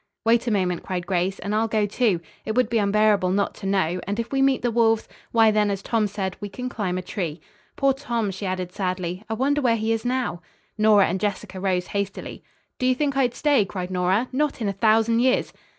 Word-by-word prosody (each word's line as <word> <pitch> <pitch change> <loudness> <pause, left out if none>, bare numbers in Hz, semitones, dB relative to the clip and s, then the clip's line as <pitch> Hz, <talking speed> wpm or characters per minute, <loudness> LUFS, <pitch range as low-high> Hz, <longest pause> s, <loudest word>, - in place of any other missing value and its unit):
"Wait 235 +1 +3
a - - +3
moment," 185 -4 0
cried 180 -2 -4
Grace, 185 +1 0
"and 205 - -4
I'll 220 +1 +2
go, 215 -1 +1
too. 205 -4 +1 0.2
It 220 - -3
would 250 -3 +2
be 230 - +2
unbearable 205 -2 +3
not 200 +2 0
to 195 - -5
know 185 -2 0
and 205 +3 -2
if 230 - -3
we 270 -1 +1
meet 270 -2 +2
the 240 - +1
wolves, 225 -1 +2 0.2
why, 225 -1 +5
then, 210 -1 +2
as 200 -1 -3
Tom 225 -3 +1
said, 190 -2 -4
we 205 - -4
can 250 +5 -5
climb 185 -6 -2
a 185 - -4
tree. 175 -5 -4 0.4
Poor 275 -1 +3
Tom!" 235 -6 -2
she 190 +1 -5
added 185 -1 -3
sadly. 185 -1 -3
"I 220 - -1
wonder 285 +5 +1
where 240 -4 +3
he 220 0 -1
is 225 - -2
now." 245 -9 -1 0.3
Nora 215 -2 +5
and 190 +2 -1
Jessica 200 -2 -3
rose 185 -2 0
hastily. 200 -1 -4 0.4
"Do 255 - +1
you 255 - +3
think 280 0 -1
I'd 250 -3 +1
stay?" 285 -7 +3
cried 185 -2 -5
Nora. 185 +6 +1
"Not 290 +2 0
in 220 - -1
a 200 - -1
thousand 225 +3 +3
years!" 255 +1 +2
210 Hz, 230 wpm, -24 LUFS, 190-235 Hz, 0.4 s, why